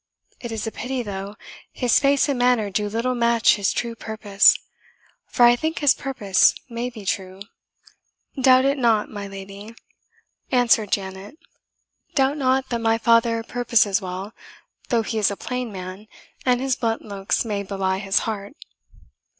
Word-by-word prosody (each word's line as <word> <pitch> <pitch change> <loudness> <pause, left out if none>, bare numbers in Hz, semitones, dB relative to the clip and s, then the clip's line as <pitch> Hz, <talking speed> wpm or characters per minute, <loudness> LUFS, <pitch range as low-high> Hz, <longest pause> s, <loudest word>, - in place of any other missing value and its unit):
It 235 - -7
is 220 -1 -4
a 225 - -3
pity, 250 +2 -4
though, 200 -1 -6 0.4
his 245 -2 +2
face 280 0 +3
and 275 -3 -1
manner 245 -4 +2
do 205 +2 -1
little 230 +4 -1
match 235 -1 +3
his 200 -2 0
true 235 -1 -3
purpose 220 -3 +3 0.7
for 245 - +1
I 240 0 +6
think 315 +6 -3
his 290 -3 +4
purpose 205 -9 +2
may 240 0 -4
be 220 -5 -11
true." 190 0 -3 1.0
"Doubt 255 0 +5
it 275 0 +1
not, 225 -4 +2
my 205 -1 -6
lady," 195 +3 -10 0.8
answered 235 -5 +3
Janet 195 +6 -4 0.8
"doubt 275 +1 +2
not 265 -1 +1
that 235 - -2
my 225 0 +2
father 230 0 +2
purposes 225 -4 +1
well, 190 +3 -6 0.6
though 235 -3 +2
he 220 0 -3
is 210 - +3
a 200 - -5
plain 250 -2 -4
man, 185 +2 -8 0.4
and 250 -1 +3
his 265 -1 0
blunt 225 -1 -2
looks 200 +1 -2
may 205 -3 -2
belie 190 -1 -2
his 195 0 +1
heart." 210 +1 -5
225 Hz, 160 wpm, -22 LUFS, 200-245 Hz, 1.0 s, I